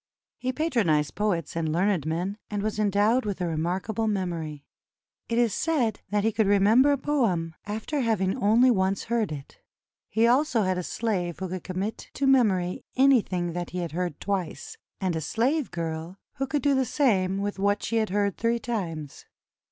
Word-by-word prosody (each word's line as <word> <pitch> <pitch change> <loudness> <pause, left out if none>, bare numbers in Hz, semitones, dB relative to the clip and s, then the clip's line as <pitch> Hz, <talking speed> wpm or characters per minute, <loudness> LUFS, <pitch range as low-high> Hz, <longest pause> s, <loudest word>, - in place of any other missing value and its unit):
He 255 - -1
patronized 220 - +1
poets 185 -8 -1
and 160 -2 -1
learned 180 -1 +1
men, 180 +6 -2
and 205 -1 -2
was 215 0 -2
endowed 210 +4 +3
with 205 -3 -3
a 180 - -1
remarkable 180 +7 -1
memory. 170 -8 -3 0.6
It 230 - 0
is 235 -4 +3
said 260 -10 0
that 205 +1 +1
he 225 - +2
could 215 -1 +1
re 205 0 +5
member 230 +8 +5
a 285 - +2
poem 210 - 0
after 220 +8 -3
having 215 -6 +1
only 240 +2 +4
once 190 -2 +1
heard 230 -5 -1
it. 140 -2 -8 0.5
He 220 +2 +2
also 245 -1 +3
had 185 -1 0
a - - -1
slave 180 -4 -2
who 190 0 -4
could 185 -1 -5
commit 190 +4 -4
to 280 - 0
memory 205 -10 +3
anything 210 -10 +3
that 175 0 -4
he 180 - -6
had 170 -3 -3
heard 175 -2 -3
twice, 195 -4 -3 0.2
and 185 -3 -1
a 160 - -2
slave 250 - 0
girl 165 +2 -4 0.2
who 270 0 -1
could 285 0 -1
do 285 -1 +4
the 265 -1 +3
same 200 -9 +1
with 200 0 -3
what 205 +1 +1
she 230 - -1
had 220 -1 +1
heard 200 0 0
three 230 +1 +1
times. 175 - -5
200 Hz, 185 wpm, -26 LUFS, 180-235 Hz, 0.6 s, re